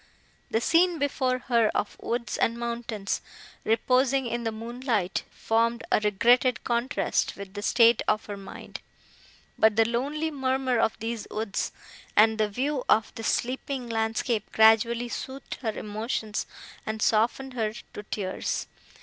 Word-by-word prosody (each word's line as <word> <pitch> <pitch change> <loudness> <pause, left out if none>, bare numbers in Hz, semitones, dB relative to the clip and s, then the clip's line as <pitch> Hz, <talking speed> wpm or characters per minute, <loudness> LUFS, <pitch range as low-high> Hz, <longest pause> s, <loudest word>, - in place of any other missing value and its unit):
The 225 - +1
scene 340 +5 +3
before 265 -3 0
her 235 -3 +4
of 205 - -1
woods 235 -2 -2
and 230 - +1
mountains, 235 -4 -3 0.4
reposing 255 +4 +2
in 235 0 -2
the 225 - 0
moonlight, 230 -3 -2
formed 230 +2 0
a - - +5
regretted 240 +5 +3
contrast 240 +3 0
with 200 -1 -8
the 205 - -5
state 230 +1 +5
of 215 0 +1
her 205 - -5
mind; 195 -1 -9 0.8
but 220 -1 +5
the 225 0 +5
lonely 290 +7 -1
murmur 260 -3 0
of 220 - +1
these 225 0 -4
woods, 215 -2 -2 0.4
and 220 +1 +5
the 215 -1 +2
view 260 +5 -1
of 215 -1 +3
this 225 - -4
sleeping 255 0 -2
landscape, 225 0 -1
gradually 225 +2 +4
soothed 265 +3 -6
her 220 -4 -1
emotions 215 0 -3 0.4
and 220 0 -4
softened 235 +5 +1
her 220 -3 -1 0.2
to - - -6
tears. 200 -2 -3
230 Hz, 140 wpm, -27 LUFS, 220-255 Hz, 0.8 s, a